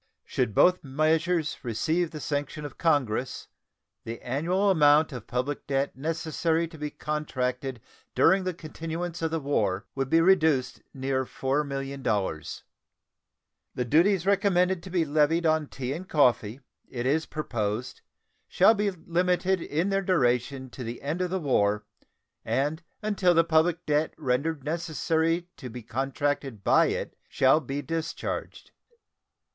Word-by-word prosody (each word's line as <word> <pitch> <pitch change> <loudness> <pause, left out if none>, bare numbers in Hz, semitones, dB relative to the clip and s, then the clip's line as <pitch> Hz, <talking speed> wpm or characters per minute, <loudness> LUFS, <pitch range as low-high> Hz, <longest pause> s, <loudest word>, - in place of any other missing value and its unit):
Should 105 - -1
both 180 0 +4
measures 155 +3 +1
receive 155 +8 0
the 155 - -8
sanction 145 +1 -3
of 145 - -9
Congress, 135 -7 0 0.6
the 115 +1 -6
annual 175 +10 +1
amount 150 -2 +5
of 125 -6 -8
public 130 +4 -3
debt 135 0 0
necessary 165 +3 -1
to 165 - -12
be 150 0 -3
contracted 130 -4 -3 0.4
during 190 0 +4
the 185 -2 -2
continuance 165 +2 -5
of 165 - 0
the 165 0 -1
war 110 -9 0
would 135 -1 -2
be 165 - +5
reduced 160 -7 +3
near 130 -1 -1
$4,000,000. 135 - -2 1.1
The 125 - -1
duties 175 - +3
recommended 190 -3 +2
to 190 - -10
be 175 -3 +1
levied 155 +3 +2
on 155 -1 +2
tea 130 -1 -4
and 185 +5 -7
coffee 125 -4 +2 0.3
it 120 -1 -4
is 155 +5 +1
proposed 120 -6 -3 0.5
shall 195 +5 +5
be 205 -1 0
limited 180 +1 0
in 165 +6 -1
their 195 0 +1
duration 130 -6 0
to 125 - -7
the 115 +1 -6
end 155 +6 -2
of 180 - 0
the 190 +1 -1
war, 105 - +1 0.6
and 150 +5 -1 0.2
until 195 -4 +2
the 165 - +6
public 165 +1 +2
debt 150 +1 0
rendered 140 +2 -1
necessary 165 +2 0
to 130 - -8
be 120 0 -8
contracted 135 -1 -2
by - - +5
it - - -3
shall 135 +3 +4
be 145 -1 -4
discharged. 165 -1 -4
150 Hz, 140 wpm, -27 LUFS, 130-170 Hz, 1.1 s, the